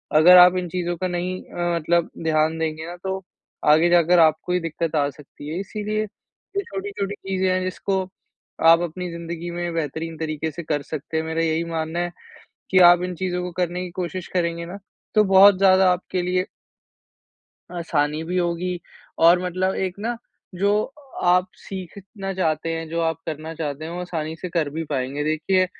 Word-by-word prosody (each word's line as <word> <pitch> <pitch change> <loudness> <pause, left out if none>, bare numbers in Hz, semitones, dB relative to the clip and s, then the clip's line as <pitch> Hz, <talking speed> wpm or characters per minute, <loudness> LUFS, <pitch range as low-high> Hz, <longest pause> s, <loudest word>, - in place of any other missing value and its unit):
अगर 180 +4 +9
आप 180 +1 +8
इन 180 -1 -2
चीज़ों 175 0 -2
का 185 - -1
नहीं 180 +1 -3
अ, 175 0 -2
मतलब 170 +1 +1
ध्यान 160 0 +2
देंगे 160 0 -2
ना, 175 - -6
तो 190 +1 -4 0.5
आगे 165 +3 +4
जाकर 175 0 +5
आपको 160 +2 +3
ही 180 - +2
दिक़्क़त 165 -1 -3
आ 145 -2 +2
सकती 145 +1 -12
है। 165 - -3
इसीलिए, 210 +2 -2 0.5
ये 400 - +1
छोटी-छोटी 200 - -4
चीज़ें 190 -1 -1
हैं 185 0 +1
जिसको 190 +1 -1 0.7
आप 165 0 +8
अपनी 175 +1 -4
ज़िंदगी 170 0 -6
में 175 0 -3
बेहतरीन 160 +1 -3
तरीके 155 0 -3
से 170 +3 -7
कर 150 -2 -1
सकते 155 +2 -5
हैं, 160 - 0
मेरा 160 +1 -2
यही 160 0 +1
मानना 165 0 -3
है 175 0 -1 0.6
कि 185 - +5
आप 175 0 +4
इन 180 0 -3
चीज़ों 180 0 -2
को 180 - -4
करने 180 0 -2
की 180 - -7
कोशिश 180 0 -4
करेंगे 170 -1 -1
ना, 185 +4 -7 0.4
तो 215 -1 +5
बहुत 195 0 +7
ज़्यादा 190 -1 +5
आपके 180 0 -2
लिए 180 +1 0 1.3
आसानी 155 -2 0
भी 180 +2 -3
होगी। 175 +1 -1 0.4
और 170 +2 +6
मतलब 185 +1 0
एक 185 -1 -2
ना, 235 +3 -2 0.4
जो 200 +3 +2 0.5
आप 180 +1 +4
सीखना 195 +1 -7
चाहते 160 -3 0
हैं, 165 0 -5
जो 165 +1 -2
आप 165 -1 0
करना 160 0 -5
चाहते 150 -1 -4
हैं, 165 - -6
वो 175 - -4
आसानी 160 -3 -4
से 180 - -6
कर 165 -4 0
भी 160 +3 -4
पाएँगे। 140 +1 -2
देखिए, 160 +5 +2
175 Hz, 185 wpm, -23 LUFS, 160-185 Hz, 1.3 s, अगर